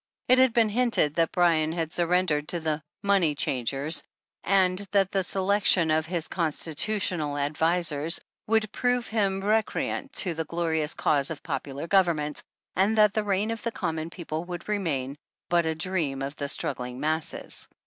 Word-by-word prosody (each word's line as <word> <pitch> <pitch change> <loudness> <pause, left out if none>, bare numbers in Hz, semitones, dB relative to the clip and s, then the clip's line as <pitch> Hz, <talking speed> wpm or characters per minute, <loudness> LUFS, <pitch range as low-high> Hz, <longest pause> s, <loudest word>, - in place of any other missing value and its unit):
It 255 +1 +5
had 260 - +8
even 250 - -3
been 225 -2 +3
hinted 230 - +3
that 165 0 +1
Bryan 165 -3 +2
had 165 -2 -3
surrendered 170 -4 +1
to 175 - +1
the 155 -1 -2 0.2
money 190 -7 +3
changers," 135 +4 0 0.4
and 185 -1 +3
that 195 -2 +3
the 195 -1 0
selection 190 -3 +2
of 160 0 +1
his 170 -2 -2
con 170 -4 0
stitutional 160 -2 -1
advisers 160 +1 +1 0.3
would 215 -1 +1
prove 245 0 0
him 195 -3 0
recreant 220 +6 -1
to 180 -8 +2
the 160 0 -3
glorious 160 -2 -1
cause 145 -1 +1
of 160 - -7
popular 140 +2 -4
government, 170 -5 +1 0.3
and 200 +4 +2
that 210 -1 +5
the 215 - 0
Reign 205 +2 0
of 230 - -5
the 235 - -2
Common 160 -5 -3
People 165 -2 -5
would 175 -1 -7
remain 150 -10 -2 0.3
but 170 -1 +2
a 160 - -1
dream 160 -6 -2
of 140 +2 -5
the 145 - -4
''struggling 125 -3 -3
masses." 155 +3 -2
170 Hz, 170 wpm, -26 LUFS, 155-200 Hz, 0.4 s, had